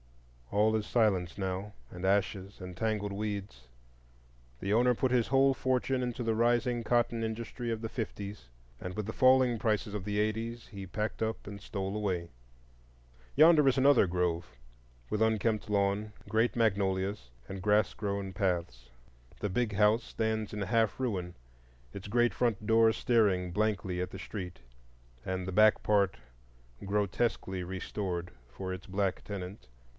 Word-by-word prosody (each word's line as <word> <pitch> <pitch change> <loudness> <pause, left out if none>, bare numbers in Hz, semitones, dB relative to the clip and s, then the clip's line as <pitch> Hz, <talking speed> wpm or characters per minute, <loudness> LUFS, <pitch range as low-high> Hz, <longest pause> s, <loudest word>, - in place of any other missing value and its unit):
All 105 +2 +3
is 110 -1 -1
silence 95 -7 +1
now, 95 +1 -3 0.2
and 90 0 -8
ashes, 100 0 0
and 90 -1 -8
tangled 105 0 -1
weeds. 100 - -5 0.9
The 100 +1 -1
owner 125 +2 +4
put 125 +2 0
his 125 -3 +3
whole 135 0 +4
fortune 130 0 0
into 125 0 -3
the 115 -1 +1
rising 120 +1 +2
cotton 120 0 +1
industry 115 +2 -4
of 110 -1 -3
the 115 - -2
fifties, 100 - -6 0.3
and 90 0 -5
with 105 - -3
the 110 - -4
falling 130 -2 +4
prices 105 -1 0
of 105 -3 -3
the 105 +1 -1
eighties 115 +2 -2
he 100 -3 -8
packed 105 +5 -3
up 110 0 -2
and 100 0 -7
stole 95 0 -4
away. 95 -5 -2 1.0
Yonder 155 0 +7
is 135 - +4
another 135 -6 +5
grove, 90 -1 -1 0.6
with 105 - -1
unkempt 110 -1 +1
lawn, 100 +1 +1 0.2
great 115 +2 +1
magnolias, 100 - 0 0.2
and 95 -1 -6
grass 105 +2 +3
grown 100 -2 -3
paths. 85 -11 -2 0.5
The 105 - -1
Big 115 +3 0
House 105 +3 +4
stands 110 -1 -2
in 105 -1 -3
half 110 +2 +1
ruin, 95 -9 -2 0.6
its 100 +1 -7
great 120 +2 +3
front 115 -4 0
door 115 +1 +5
staring 100 -7 +2
blankly 95 -2 0
at 90 - -2
the 95 - -9
street, 90 -3 -6 0.6
and 95 0 -3
the 95 - -3
back 110 +2 +5
part 100 -8 +2 0.7
grotesquely 100 -1 -1
restored 90 -1 -4 0.2
for 95 +8 -5
its 95 - -8
black 95 0 -1
tenant. 100 - -7
105 Hz, 150 wpm, -31 LUFS, 95-115 Hz, 1.0 s, Yonder